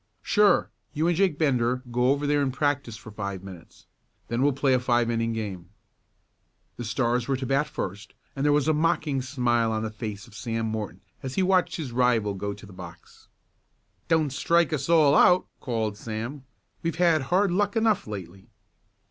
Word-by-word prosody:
"Sure. 205 -3 +3 0.2
You 155 +3 0
and 175 - +2
Jake 180 -4 +2
Bender 125 -5 +1
go 125 +1 +2
over 140 +2 +1
there 145 0 +2
and 135 -2 0
practice 135 -4 -1
for 110 - -12
five 100 -2 -5
minutes. 90 -4 -13 0.4
Then 120 +2 -1
we'll 145 +1 +4
play 135 0 +1
a 130 - +3
five 120 -1 +1
inning 115 0 0
game." 105 -6 -5 1.1
The 120 - -5
Stars 120 +1 0
were 135 -1 0
to 130 - -4
bat 135 +4 +1
first, 100 +3 -6 0.2
and 135 - -2
there 145 - +4
was 145 0 +2
a 155 - +4
mocking 155 -3 +1
smile 120 -3 0
on 110 0 -1
the 110 - -3
face 105 -2 -6
of - - -18
Sam 115 +1 -3
Morton 110 -2 -4 0.2
as 130 -1 -5
he 190 - +2
watched 185 -1 +2
his 150 -7 -5
rival 120 -4 +2
go 100 +1 -4
to 100 +1 -10
the 100 - -13
box. 90 -2 -12 0.8
"Don't 155 -4 +2
strike 170 +3 +2
us 140 0 -2
all 155 -4 +5
out," 180 +4 +5
called 110 -5 -2
Sam. 115 +6 -5 0.4
"We've 165 0 -2
had 165 -3 +3
hard 190 +1 +3
luck 205 +3 0
enough 220 - +2
lately." 95 0 -8
125 Hz, 190 wpm, -26 LUFS, 110-150 Hz, 1.1 s, all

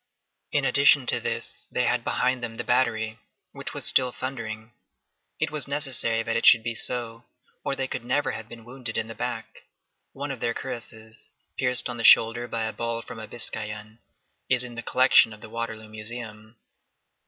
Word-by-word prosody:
In 145 -2 +1
addition 140 +1 +5
to - - +2
this, - - -1
they - - 0
had - - 0
behind 130 0 -1
them 115 -1 -5
the - - -4
battery, 115 -3 0 0.3
which - - -7
was - - -4
still 125 -1 +5
thundering. 115 -4 -6 0.7
It - - -1
was 150 -2 -1
necessary 135 -5 +1
that 115 0 -2
it - - +3
should 115 -2 +7
be 115 0 -2
so, 115 0 0 0.4
or 140 - -1
they 135 -1 -1
could - - -4
never 125 +4 +1
have 110 -1 -6
been 115 -1 -12
wounded 120 -2 -4
in 110 0 -1
the 115 - -7
back. - - -6 0.5
One 140 +1 -5
of 135 - -7
their 115 0 -2
cuirasses, 110 -3 -8 0.3
pierced 125 -1 +6
on 120 -1 -6
the 115 - -4
shoulder 115 +2 +5
by 115 -1 -1
a 110 0 -2
ball 115 +1 -3
from - - -10
a 110 - -8
biscayan,9 110 -1 -3 0.5
is 125 -1 +3
in 125 -1 -8
the 120 - -6
collection 125 -2 +4
of 105 - -14
the 110 - -11
Waterloo 110 -1 -5
Museum. 110 0 -7
115 Hz, 190 wpm, -25 LUFS, 110-125 Hz, 0.7 s, should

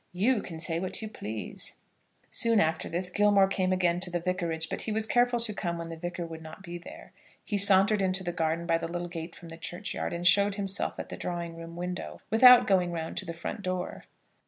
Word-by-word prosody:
You 210 +5 +2
can 165 -3 -8
say 165 0 0
what 185 +1 +2
you - - -3
please." 110 - -3 0.6
Soon 230 -2 +3
after 160 -2 0
this, 180 +2 -1
Gilmore 205 0 +4
came 185 -1 0
again 180 -2 +1
to 180 0 0
the 175 0 -2
Vicarage; 170 -2 -2
but - - -4
he 220 - -3
was 220 +1 +2
careful 245 +1 +2
to 225 -2 0
come 170 -3 -3
when 165 0 -6
the 165 - -6
Vicar 175 +1 -5
would 165 -1 -8
not 160 +4 -11
be 175 -1 -7
there. 170 - -12 0.3
He 210 - -2
sauntered 200 +1 +5
into 190 0 +1
the 175 - -2
garden 165 0 -1
by 165 -1 +1
the 165 - -4
little 175 +1 -4
gate 165 -1 -7
from 170 - -12
the 165 - -9
churchyard, 175 +4 -5
and 170 +1 -4
showed 200 +3 +5
himself 195 -2 -2
at - - -6
the - - -6
drawing 170 -1 -4
room 165 0 -9
window, 180 +1 -5
without 250 +2 +8
going 180 -3 +2
round 165 -1 -4
to - - -2
the 170 - -5
front 185 +5 -5
door. 185 -1 -4
180 Hz, 230 wpm, -28 LUFS, 170-200 Hz, 0.6 s, without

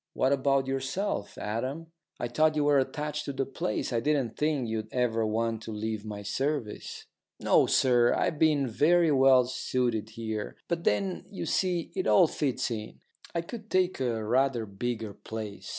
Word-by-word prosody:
"What 130 +2 +2
about 135 0 +2
yourself, 135 - -2
Adam? 130 +10 -4 0.3
I 120 - -1
thought 155 +6 +2
you 150 - +2
were 145 -1 +4
attached 150 +3 -3
to 140 - -4
the 135 0 -1
place. 125 -3 -3
I 115 - +2
didn't 130 -3 0
think 150 -5 0
you'd 110 -1 -4
ever 115 -3 +1
want 115 +1 -1
to 110 - -7
leave 110 0 -3
my 105 -1 -6
service." 135 +2 -3 0.3
"No, - - +4
sir, 120 -2 +4
I've 150 - 0
been 150 -4 +3
very 160 +7 +3
well 130 -2 +6
suited 120 -3 -1
here. 110 -2 -5
But 170 0 -2
then, 190 -2 0
you 200 - -5
see, 180 -3 0
it 375 - -1
all 185 - +6
fits 130 -5 -1
in. 110 -2 -6 0.4
I 170 - +1
could 220 +5 -9
take 185 -3 +1
a 115 -4 -1
rather 125 0 +2
bigger 110 +1 -4
place. 110 -1 -7
130 Hz, 170 wpm, -28 LUFS, 110-150 Hz, 0.4 s, well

